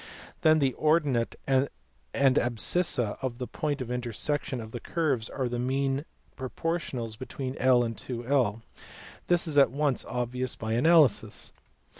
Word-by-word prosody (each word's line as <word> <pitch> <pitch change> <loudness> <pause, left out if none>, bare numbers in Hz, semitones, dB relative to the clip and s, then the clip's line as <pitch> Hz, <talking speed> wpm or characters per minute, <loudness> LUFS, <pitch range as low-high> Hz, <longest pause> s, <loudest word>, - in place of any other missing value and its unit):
Then 155 0 +5
the 135 -4 +2
ordinate 150 -7 +2
and 135 +1 +2 0.5
the 135 -2 +4
abscissa 120 - +1
of 130 -3 -3
the 125 - -4
point 145 +1 -3
of 125 -1 -4
intersection 125 +3 -2
of 110 -1 -8
these 120 - -6
curves 140 -9 -1
are 130 -2 -2
the 120 0 -3
mean 135 +3 0 0.3
proportionals 130 -5 -3
between 130 +1 -5
I 130 - +1 0.2
and 115 0 -4
21. 120 0 -1 0.6
This 175 -1 +3
is 150 -3 +3
at 140 - +6
once 140 0 0
obvious 125 +1 -3
by 110 0 -3
analysis. 145 -1 +3
130 Hz, 145 wpm, -28 LUFS, 120-145 Hz, 0.6 s, at